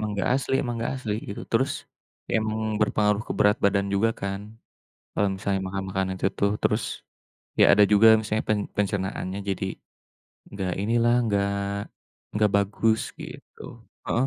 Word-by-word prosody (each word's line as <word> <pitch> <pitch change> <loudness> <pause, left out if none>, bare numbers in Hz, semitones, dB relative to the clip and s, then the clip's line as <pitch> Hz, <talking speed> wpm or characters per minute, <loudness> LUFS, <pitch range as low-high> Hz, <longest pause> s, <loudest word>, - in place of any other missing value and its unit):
emang 105 -1 -2
enggak 100 +4 -1
asli 135 0 -1
emang 120 -2 -3
enggak 115 - -2
asli, 105 -2 -1
gitu. 100 - -6
Terus, 130 +4 +2 0.6
emang 110 0 -1
berpengaruh 105 0 +2
ke - - -3
berat 105 +1 +4
badan 100 0 +3
juga 115 +3 +3
kan, 100 0 -3 0.7
kalau 100 - +2
misalnya 95 0 -1
makan-makanan 95 0 -2
itu - - 0
tuh. 100 0 +2
Terus, 105 +2 +2 0.8
ya - - +7
ada 105 - +5
juga 110 +2 +8
misalnya 110 0 -2
pen 105 -1 +2 0.2
pencernaannya 95 -1 -2
jadi 95 0 -2 0.9
enggak 95 -3 -3
inilah, 120 +2 +3
enggak 100 -4 +1 0.8
enggak 105 -1 +3
bagus, 110 +2 +1 0.2
gitu. - - -11 0.4
Heeh. 125 +3 +1
105 Hz, 145 wpm, -25 LUFS, 100-110 Hz, 0.9 s, juga